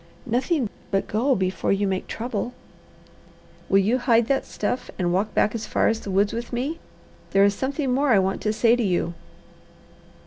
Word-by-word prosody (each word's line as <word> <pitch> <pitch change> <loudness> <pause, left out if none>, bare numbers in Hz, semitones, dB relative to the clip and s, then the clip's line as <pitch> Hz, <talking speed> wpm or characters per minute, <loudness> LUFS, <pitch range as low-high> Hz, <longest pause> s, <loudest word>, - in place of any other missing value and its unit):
"Nothing 255 +3 0 0.2
but 195 -1 0
go, 250 +6 +1
before 185 0 -1
you 200 +1 +1
make 190 -1 -2
trouble." 235 +1 -4 1.2
"Will 195 - +5
you 215 +6 +2
hide 235 -2 +3
that 270 +3 0
stuff 245 +4 -3
and 175 -2 0
walk 205 +4 -1
back 210 - +3
as 220 -2 -4
far - - +2
as 225 0 0
the 205 - -8
woods 200 +2 +2
with 235 +1 -5
me? 265 +7 -2 0.5
There 195 0 +6
is 200 - +3
something 270 +3 -1
more 280 +2 +2
I 225 - +6
want 190 0 0
to 215 - 0
say 230 +2 +3
to 245 - -1
you." 175 -3 0
225 Hz, 185 wpm, -24 LUFS, 195-250 Hz, 1.2 s, There